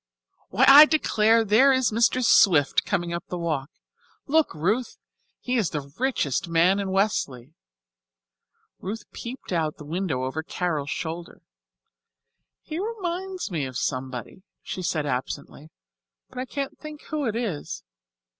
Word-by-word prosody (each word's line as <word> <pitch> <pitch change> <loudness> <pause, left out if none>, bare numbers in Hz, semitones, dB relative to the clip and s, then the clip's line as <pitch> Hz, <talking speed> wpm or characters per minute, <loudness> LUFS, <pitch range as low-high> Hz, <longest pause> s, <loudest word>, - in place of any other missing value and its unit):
Why, 240 +8 +3
I 285 +3 +11
declare, 225 -7 +3
there 225 +7 +5
is 260 -3 +2
Mr. 235 +3 +2
Swift 160 -11 +4
coming 170 0 -1
up 170 - -4
the 180 - -4
walk. 155 -5 -2 0.6
Look, 315 +2 +2
Ruth! 210 +11 -1 0.4
He 250 0 -1
is 210 -7 +1
the 140 -2 -6
richest 240 - 0
man 170 +4 +3
in 195 -1 -2
Westleigh." 155 - -1 1.3
Ruth 210 +3 -5
peeped 240 -4 -7
out 160 -3 0
of - - -41
the 150 - -11
window 160 -5 -2
over 130 +5 -3
Carol's 160 -3 -3
shoulder. 170 +1 -6 1.2
"He 315 +2 -5
reminds 380 - -4
me 160 -5 -2
of 130 -1 -6
somebody," 130 +6 -4 0.2
she 185 - -5
said 155 -4 -1
absently, 140 +3 -5 0.6
"but - - -8
I 255 - -2
can't 275 +1 -5
think 305 -1 -10
who 300 -2 -2
it 220 - -2
is. 210 -11 -4
190 Hz, 145 wpm, -25 LUFS, 155-255 Hz, 1.3 s, I